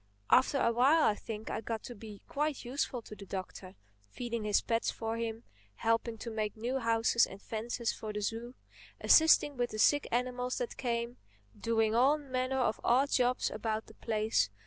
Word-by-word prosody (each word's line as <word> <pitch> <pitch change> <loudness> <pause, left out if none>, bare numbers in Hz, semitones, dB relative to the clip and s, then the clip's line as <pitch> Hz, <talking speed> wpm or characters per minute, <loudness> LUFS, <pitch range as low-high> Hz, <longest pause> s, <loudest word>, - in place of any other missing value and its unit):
After 265 +2 +5
a 235 - +3
while 275 +7 +4
I - - +4
think 215 +1 -7
I - - -3
got 225 0 -4
to 245 - -7
be 210 -2 -11
quite 295 -2 -2
useful 250 -1 -2
to 215 - -10
the 200 -1 -11
Doctor, 185 0 -7 0.3
feeding 235 - -4
his 210 -1 +3
pets 230 0 0
for 225 0 -3
him; 230 0 -4 0.3
helping 230 - 0
to 230 +2 -6
make 215 -1 -3
new 245 +4 -2
houses 230 0 +3
and 195 - -11
fences 230 +2 -3
for 215 - -6
the 210 0 -4
zoo; 230 +4 -4 0.4
assisting 315 -3 +5
with 245 0 0
the 215 - -6
sick 290 +6 +4
animals 250 +1 -1
that 245 - -3
came; 235 -1 -2 0.4
doing 225 -1 +1
all 265 +6 +4
manner 260 -2 -2
of 230 -3 0
odd 265 +4 +3
jobs 250 0 +2
about 220 -1 -3
the - - -15
place. 215 - 0
235 Hz, 185 wpm, -32 LUFS, 220-250 Hz, 0.4 s, After